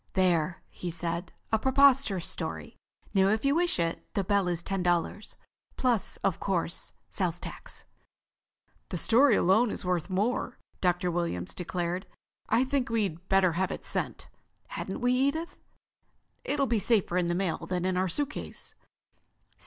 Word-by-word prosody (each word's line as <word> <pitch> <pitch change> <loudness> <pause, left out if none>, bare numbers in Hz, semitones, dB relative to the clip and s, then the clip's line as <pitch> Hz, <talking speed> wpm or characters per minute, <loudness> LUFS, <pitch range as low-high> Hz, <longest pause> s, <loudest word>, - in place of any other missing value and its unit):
"There," 175 -3 +1
he 180 - -5
said. 170 +1 -3 0.2
"A 220 - +3
preposterous 265 -7 +4
story. - - -4 0.4
Now 195 -1 +4
if 215 +5 +1
you 275 - +4
wish 345 +2 +2
it, 165 -1 -1
the 200 - +1
bell 200 -1 +2
is 175 -1 -1
ten 195 -1 -2
dollars. 175 +4 -1 0.4
Plus, 245 -5 +1
of 185 - +1
course, 175 -3 -2 0.2
sales 175 -3 -1
tax." - - -8 1.1
"The 180 - -2
story 235 - +5
alone 215 +7 +4
is - - -3
worth 180 -1 0
more," 220 +6 -1 0.2
Dr. 180 0 +1
Williams 165 - -2
declared. 180 0 -3 0.4
"I 230 +3 +4
think 265 -1 0
we'd 195 -6 -1
better 195 -2 +4
have 185 +3 0
it - - -6
sent, - - -1 0.4
hadn't - - -5
we, 245 0 +3
Edith? 280 +6 0 0.8
It'll 285 -1 +1
be 235 -3 +1
safer 205 -5 +2
in 180 -1 +2
the 175 - 0
mail 175 -2 -1
than 180 0 -1
in 185 0 +1
our 185 0 +1
suitcase." 290 - -4
190 Hz, 155 wpm, -29 LUFS, 175-235 Hz, 1.1 s, story